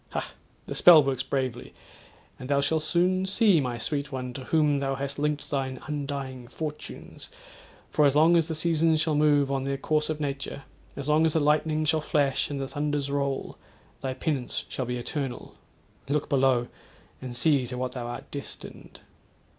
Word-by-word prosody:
Ha! -, -, -3 dB, 0.3 s
the -, -, -5 dB
spell 165 Hz, -4 st, +8 dB
works 135 Hz, -2 st, -1 dB
bravely, 130 Hz, -2 st, -3 dB, 0.6 s
and 125 Hz, -, -8 dB
thou 140 Hz, -1 st, +3 dB
shall 160 Hz, +3 st, +1 dB
soon 180 Hz, +4 st, +1 dB
see, 200 Hz, -4 st, +4 dB
my 125 Hz, -3 st, -2 dB
sweet 140 Hz, +4 st, -2 dB
one, 125 Hz, -2 st, -4 dB
to 130 Hz, 0 st, -7 dB
whom 150 Hz, -3 st, +2 dB
thou 135 Hz, -1 st, -1 dB
hast 140 Hz, +1 st, -4 dB
linked 150 Hz, 0 st, -1 dB
thine 130 Hz, -2 st, -2 dB
undying 140 Hz, -4 st, -4 dB
fortunes, 150 Hz, +3 st, -7 dB, 0.6 s
for 150 Hz, -, +3 dB
as 140 Hz, -, +1 dB
long 160 Hz, +3 st, +6 dB
as 165 Hz, -2 st, +3 dB
the 160 Hz, -, -3 dB
seasons 160 Hz, 0 st, +3 dB
shall 160 Hz, 0 st, +1 dB
move 145 Hz, -2 st, +3 dB
on 135 Hz, -1 st, 0 dB
their 135 Hz, 0 st, -2 dB
course 150 Hz, +2 st, 0 dB
of 155 Hz, -1 st, -2 dB
nature—as 140 Hz, -1 st, -6 dB
long 155 Hz, +1 st, +4 dB
as 160 Hz, -2 st, +3 dB
the 160 Hz, -, +3 dB
lightning 155 Hz, +1 st, +2 dB
shall 155 Hz, 0 st, +2 dB
flash, 140 Hz, -3 st, +1 dB
and 145 Hz, -1 st, -3 dB
the 135 Hz, -, -3 dB
thunders 145 Hz, -1 st, -2 dB
roll, 140 Hz, -1 st, -2 dB, 0.4 s
thy 130 Hz, -1 st, -3 dB
penance 135 Hz, -2 st, -2 dB
shall 130 Hz, -, -3 dB
be 125 Hz, +1 st, -3 dB
eternal. 130 Hz, +1 st, -4 dB, 0.6 s
Look 150 Hz, 0 st, 0 dB
below! 130 Hz, -4 st, +3 dB, 0.5 s
and 125 Hz, -2 st, -6 dB
see 130 Hz, 0 st, +3 dB
to 125 Hz, +1 st, -5 dB
what 130 Hz, 0 st, -2 dB
thou 125 Hz, -2 st, -5 dB
art 120 Hz, -, -7 dB
destined.' 140 Hz, -1 st, -9 dB
140 Hz, 180 wpm, -27 LUFS, 135-155 Hz, 0.6 s, spell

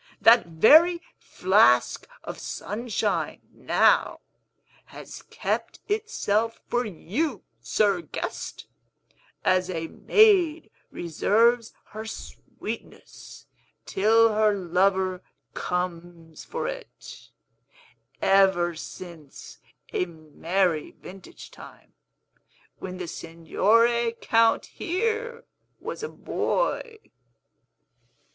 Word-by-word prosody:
That 230 Hz, -3 st, +6 dB
very 310 Hz, -, +6 dB, 0.2 s
flask 125 Hz, -, +3 dB, 0.2 s
of -, -, -7 dB
Sunshine, 220 Hz, +2 st, -3 dB
now, -, -, +2 dB, 0.6 s
has -, -, -11 dB
kept -, -, -4 dB
itself 230 Hz, -, -1 dB
for 245 Hz, 0 st, -1 dB
you, 215 Hz, -, -3 dB, 0.2 s
sir 200 Hz, -, +1 dB
guest -, -, -6 dB, 0.8 s
(as 185 Hz, 0 st, +2 dB
a 165 Hz, -2 st, -4 dB
maid 355 Hz, -, +3 dB, 0.2 s
reserves 225 Hz, +8 st, +1 dB, 0.2 s
her 220 Hz, +1 st, -7 dB
sweetness -, -, -9 dB, 0.4 s
till 225 Hz, +3 st, +3 dB
her 215 Hz, -1 st, +3 dB
lover 185 Hz, 0 st, +1 dB, 0.3 s
comes 175 Hz, -2 st, -5 dB
for 485 Hz, -, -4 dB
it), -, -, -9 dB, 0.9 s
ever 190 Hz, -3 st, +4 dB
since 160 Hz, -2 st, -11 dB, 0.3 s
a 180 Hz, -, 0 dB
merry 165 Hz, +1 st, -2 dB
vintage 195 Hz, -, -12 dB
time, -, -, -15 dB, 0.9 s
when 185 Hz, -1 st, -7 dB
the 180 Hz, -1 st, -5 dB
Signore 230 Hz, +9 st, +1 dB
Count 230 Hz, 0 st, +2 dB
here 455 Hz, +6 st, -3 dB, 0.4 s
was -, -, -6 dB
a 455 Hz, -, -4 dB
boy!" 475 Hz, -2 st, -2 dB
205 Hz, 85 wpm, -25 LUFS, 175-245 Hz, 0.9 s, That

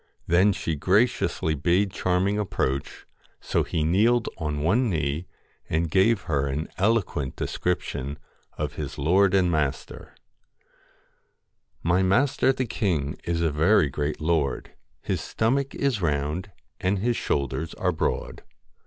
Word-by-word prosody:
Then 90 Hz, +5 st, +4 dB
she 95 Hz, -4 st, -2 dB
graciously 95 Hz, -1 st, +1 dB
bade 90 Hz, +7 st, +1 dB
Charming 95 Hz, +4 st, 0 dB
approach; 70 Hz, -9 st, -2 dB, 0.3 s
so -, -, 0 dB
he 80 Hz, -, -1 dB
kneeled 110 Hz, +9 st, +3 dB
on 75 Hz, -2 st, -2 dB
one 110 Hz, +9 st, +2 dB
knee, 80 Hz, -1 st, -2 dB, 0.4 s
and 80 Hz, 0 st, 0 dB
gave 100 Hz, +4 st, +3 dB
her 70 Hz, -5 st, -1 dB
an 70 Hz, +4 st, -3 dB
eloquent 95 Hz, -, 0 dB
description 75 Hz, -5 st, -3 dB, 0.4 s
of -, -, -3 dB
his -, -, -5 dB
lord 95 Hz, +6 st, +3 dB
and 90 Hz, -2 st, +3 dB
master 75 Hz, -4 st, -3 dB, 0.9 s
' -, -, -40 dB, 0.7 s
My 85 Hz, +3 st, +3 dB
master 125 Hz, +8 st, +3 dB
the 130 Hz, -1 st, -2 dB
king 85 Hz, -, -1 dB
is 85 Hz, -1 st, -1 dB
a 80 Hz, -2 st, +1 dB
very 80 Hz, +1 st, +3 dB
great 75 Hz, +3 st, -2 dB
lord, 80 Hz, -3 st, 0 dB, 0.3 s
His -, -, -2 dB
stomach 135 Hz, +5 st, 0 dB
is 135 Hz, -7 st, 0 dB
round 75 Hz, +4 st, -1 dB, 0.3 s
and 95 Hz, +2 st, +1 dB
his 120 Hz, +5 st, 0 dB
shoulders 70 Hz, -, -2 dB
are -, -, 0 dB
broad. -, -, -2 dB
85 Hz, 135 wpm, -25 LUFS, 75-100 Hz, 0.9 s, Then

